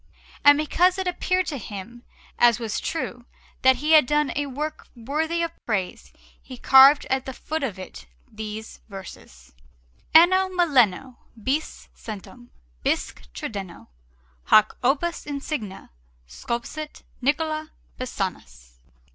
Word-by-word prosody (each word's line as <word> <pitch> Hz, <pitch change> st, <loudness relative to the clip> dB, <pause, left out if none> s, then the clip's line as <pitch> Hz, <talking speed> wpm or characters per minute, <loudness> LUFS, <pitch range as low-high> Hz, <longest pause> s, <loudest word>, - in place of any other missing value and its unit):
And 290 Hz, 0 st, +8 dB
because 355 Hz, +5 st, +2 dB
it 380 Hz, -, -2 dB
appeared 365 Hz, +1 st, 0 dB
to 285 Hz, -6 st, -4 dB
him, 225 Hz, +3 st, -9 dB, 0.4 s
as 235 Hz, -1 st, +5 dB
was 225 Hz, -3 st, -3 dB
true, 245 Hz, -7 st, -4 dB, 0.4 s
that 260 Hz, 0 st, +6 dB
he 300 Hz, +5 st, -2 dB
had 310 Hz, -5 st, +7 dB
done 295 Hz, 0 st, +1 dB
a 290 Hz, 0 st, -1 dB
work 300 Hz, +3 st, -5 dB
worthy 315 Hz, +8 st, -2 dB
of 335 Hz, -, -2 dB, 0.2 s
praise, 195 Hz, -6 st, -3 dB, 0.3 s
he 255 Hz, -, -11 dB
carved 270 Hz, +3 st, +7 dB
at 265 Hz, 0 st, 0 dB
the 265 Hz, -, -4 dB
foot 315 Hz, +1 st, -4 dB
of 230 Hz, -9 st, -3 dB
it 65 Hz, -, -10 dB, 0.2 s
these 215 Hz, 0 st, -8 dB
verses: 170 Hz, -, -12 dB, 0.6 s
ANNO 370 Hz, +3 st, +6 dB
MILLENO 260 Hz, -, +2 dB, 0.2 s
BIS 285 Hz, +6 st, -2 dB
CENTUM 230 Hz, +3 st, -10 dB, 0.3 s
BISQUE 75 Hz, -, -2 dB
TRIDENO 195 Hz, -, -7 dB, 0.6 s
HOC 215 Hz, 0 st, +5 dB
OPUS 300 Hz, +8 st, 0 dB
INSIGNE 280 Hz, -8 st, -5 dB, 0.4 s
SCULPSIT 235 Hz, -, -6 dB, 0.2 s
NICOLA 310 Hz, +3 st, -1 dB, 0.3 s
PISANUS. 180 Hz, -, -6 dB
265 Hz, 120 wpm, -24 LUFS, 215-310 Hz, 0.6 s, And